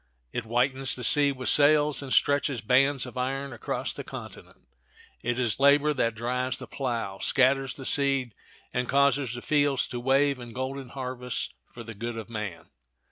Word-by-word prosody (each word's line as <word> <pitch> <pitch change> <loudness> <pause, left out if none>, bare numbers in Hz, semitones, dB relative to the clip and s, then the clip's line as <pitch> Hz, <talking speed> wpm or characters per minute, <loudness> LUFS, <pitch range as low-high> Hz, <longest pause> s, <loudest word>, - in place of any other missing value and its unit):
It 120 - -3
whitens 130 +3 +1
the 125 - -6
sea 145 +3 +6
with 130 -1 -6
sails, 150 0 +4
and 135 -2 -8
stretches 140 -2 +2
bands 135 +4 +2
of 125 0 -7
iron 135 +1 -3
across 120 - -3
the - - -7
continent. - - -11 0.5
It 120 +1 -2
is 120 -3 0
labor 145 +2 +4
that 115 -5 -1
drives 125 +2 -2
the - - -8
plow, 115 -7 -4
scatters 135 0 +1
the 135 - -9
seed, 135 -5 +2 0.4
and 125 0 -2
causes 140 -3 +2
the 120 - -8
fields 145 -3 +1
to 125 - -5
wave 135 +2 +2
in 120 -2 -10
golden 130 +1 -5
harvests 125 -1 -4 0.2
for 120 - -10
the 115 0 -9
good 115 +2 -6
of 115 0 -8
man. 105 -7 -6
130 Hz, 175 wpm, -26 LUFS, 120-140 Hz, 0.5 s, sea